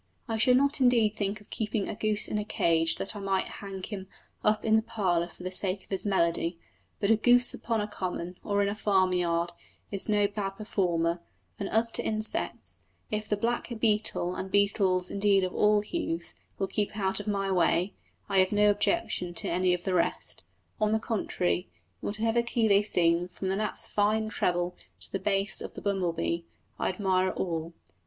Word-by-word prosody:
I 225 -1 -1
should 250 +3 +5
not 280 +1 +2
indeed 230 -4 +4
think 205 0 -2
of 210 - -21
keeping 210 -2 -2
a - - -3
goose 210 0 +1
in 210 - -1
a - - -2
cage 165 -5 +2
that 195 - +2
I - - -5
might 195 -1 0
hang 195 -2 -7
him 195 -2 -6 0.4
up 215 0 +2
in 220 0 +4
the 220 - +4
parlour 190 -7 0
for 180 - -14
the 185 - -4
sake 190 +1 0
of - - -23
his 195 +2 -2
melody, 170 -2 +1 0.4
but 205 0 +2
a - - +7
goose 245 +2 +6
upon 225 -2 -2
a 210 - -2
common, 180 -3 -4
or 205 -1 +1
in - - +1
a 200 - -1
farmyard, 180 -5 +1 0.4
is 200 +1 0
no 205 -1 +3
bad 200 -1 -4
performer; 175 -5 0 0.4
and - - -3
as 225 +1 +3
to - - +1
insects, 215 0 -1 0.3
if 215 0 -3
the 210 - +1
black 235 +3 -1
beetle, 210 -5 +1
and 190 +1 -5
beetles 195 -2 +2
indeed 200 -1 +3
of 185 - -2
all 210 0 +3
hues, 205 - -4 0.2
will 195 - 0
keep 205 +2 -2
out 190 -1 0
of 205 - -7
my 195 -1 -1
way, 180 +1 +2 0.3
I 195 -1 +2
have 185 0 +3
no 210 0 +4
objection 205 - 0
to - - -1
any 180 +1 +2
of 175 - -9
the 190 - -1
rest; 175 - 0 0.4
on 215 0 +2
the 220 - +2
contrary, 90 - -1 0.3
in - - -4
whatever 225 +3 +1
key 235 -1 0
they 200 -1 +5
sing, 175 -4 +2
from 185 +1 -5
the 190 - 0
gnat's 215 +1 -1
fine 215 +1 +1
treble 175 -3 -1 0.3
to - - -6
the 195 - -2
bass 195 +1 +1
of - - -7
the - - -7
bumble 195 -4 0
bee, 170 0 -3 0.3
I - - 0
admire 185 -1 +1
all. 165 -2 -3
200 Hz, 200 wpm, -28 LUFS, 180-215 Hz, 0.4 s, a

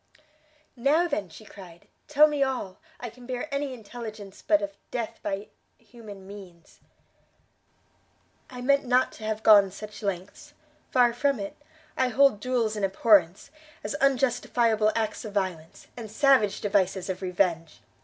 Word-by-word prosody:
"Now, 290 +8 +2
then," 210 - -3
she 215 - -14
cried, 180 -5 -14 0.2
"tell 300 0 +6
me 295 -2 -1
all: 255 -9 -2 0.2
I 240 -2 -6
can 245 +1 -15
bear 250 +2 -4
any 280 -1 -2
intelligence 215 -4 -9
but 310 -1 +2
of 300 0 -5
death 235 -3 -4
by 200 +1 -4 0.3
human 215 -4 -13
means." 190 -4 -13 1.7
"I 250 -1 -8
meant 280 +2 +3
not 255 0 +2
to 220 - -13
have 220 0 -3
gone 205 -3 +7
such 210 +3 -10
lengths; 200 +9 -5 0.3
far 245 -2 +3
from 275 +1 0
it; 200 0 -6 0.4
I 260 - +2
hold 260 -2 +3
duels 235 -2 -1
in 210 - -4
abhorrence, 195 +1 +3 0.3
as - - -3
unjustifiable 240 -5 +2
acts 220 -1 -2
of 210 -2 -8
violence, 180 -5 -3
and 230 -3 -8
savage 240 -3 +3
devices 190 -2 0
of 190 0 -4
revenge. 175 - -1
220 Hz, 145 wpm, -26 LUFS, 195-255 Hz, 1.7 s, gone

